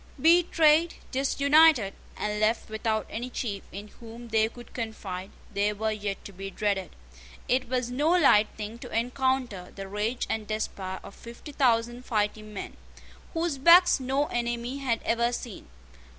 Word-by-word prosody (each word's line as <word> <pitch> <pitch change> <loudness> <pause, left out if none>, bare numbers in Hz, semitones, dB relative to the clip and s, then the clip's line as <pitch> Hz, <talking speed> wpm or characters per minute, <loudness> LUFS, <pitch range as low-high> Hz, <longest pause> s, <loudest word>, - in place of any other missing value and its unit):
Betrayed, 330 -1 +4 0.2
disunited, 280 -3 +4 0.2
and 210 0 -2
left 215 +1 0
without 220 0 -1
any 240 +3 -5
chief 205 -6 -4
in 205 +2 -8
whom 235 +1 -10
they 220 0 +2
could 240 +1 -14
confide, 200 -5 -5 0.2
they 205 +1 +1
were 220 +1 -1
yet 205 -2 -4
to 200 - -9
be 195 +1 -6
dreaded. 195 -1 -2 0.5
It 255 -1 +1
was 250 -1 -1
no 290 +5 +1
light 280 -12 +5
thing 215 +2 -6
to - - -9
encounter 245 -5 -1
the 195 -1 -7
rage 210 +5 -2
and 220 -1 -3
despair 195 -3 -4
of - - -11
fifty 235 +6 -11
thousand 240 -3 +1
fighting 215 -2 -2
men, 205 - -7 0.6
whose 325 -4 -1
backs 345 +4 +7
no 270 +3 0
enemy 240 +1 -3
had 245 -5 -1
ever 235 +1 +1
seen. 240 -4 -7
230 Hz, 150 wpm, -27 LUFS, 210-260 Hz, 0.6 s, backs